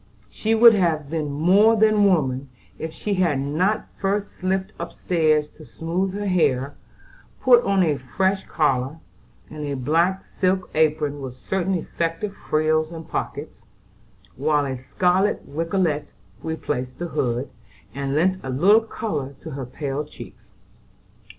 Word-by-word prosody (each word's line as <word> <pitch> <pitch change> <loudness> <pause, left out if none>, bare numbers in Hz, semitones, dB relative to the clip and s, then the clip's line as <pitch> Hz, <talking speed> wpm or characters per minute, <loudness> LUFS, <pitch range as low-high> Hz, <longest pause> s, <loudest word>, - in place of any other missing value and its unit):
She 220 +1 0
would 230 +1 +8
have 160 -7 0
been 155 -3 -2
more 190 +10 +4
than 215 -1 +4
woman 140 -8 +1 0.3
if 160 - -4
she 205 +5 -3
had 175 -7 +2
not 160 +10 0
first 200 +1 -1
slipped 190 +2 -1
upstairs 155 -4 0
to 155 - -15
smooth 165 - -3
her 205 0 -3
hair, 145 -7 +1 0.7
put 245 -2 +6
on 195 -1 +3
a 150 -4 +1
fresh 190 +9 0
collar, 135 -1 0 0.5
and 150 0 -6
a 145 -1 -2
black 165 +8 +1
silk 185 0 -1
apron 150 -2 +1
with 130 -2 -6
certain 190 +6 -1
effective 170 +3 -3
frills 155 -1 0
and 165 -1 -8
pockets, 140 -5 -5 0.7
while 145 +1 +1
a 135 -1 -3
scarlet 180 +10 +1
rigolette 160 0 -1 0.3
replaced 145 -5 -3
the 175 0 -4
hood, 125 -2 -1 0.4
and 140 0 -2
lent 185 +4 +2
a 130 - -5
little 190 - +5
color 175 -11 -4
to 160 - -7
her 135 -3 -5
pale 140 +2 -3
cheeks. 150 - -13
160 Hz, 140 wpm, -23 LUFS, 140-190 Hz, 0.7 s, would